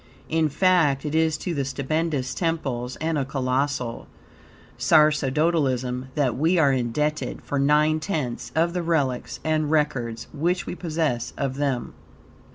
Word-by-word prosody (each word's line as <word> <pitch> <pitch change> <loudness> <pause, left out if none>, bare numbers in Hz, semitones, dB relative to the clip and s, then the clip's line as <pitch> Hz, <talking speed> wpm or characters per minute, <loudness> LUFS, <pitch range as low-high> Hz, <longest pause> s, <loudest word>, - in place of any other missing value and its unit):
In 160 -1 +2
fact, 155 -4 +3
it 150 - -3
is 160 -1 +2
to 175 +2 -3
the 140 -3 -1
stupendous 140 +1 -1
temples 135 -8 -2
and 160 -1 -1
a - - +1
colossal 130 -2 -2 0.7
sacerdotalism, 145 -4 +2
that, 135 -6 +1
we 160 +7 +2
are 145 -5 +4
indebted 150 +5 -1
for 145 - -2
nine 150 +2 +3
tenths 155 -8 -3
of 170 +2 +2
the 180 - -1
relics 145 -7 -1
and 155 -1 +1
records 125 -7 0
which 175 +5 0
we - - -4
possess 155 -9 -2
of 135 -1 -2
them. 135 -4 -1
150 Hz, 140 wpm, -24 LUFS, 130-160 Hz, 0.7 s, are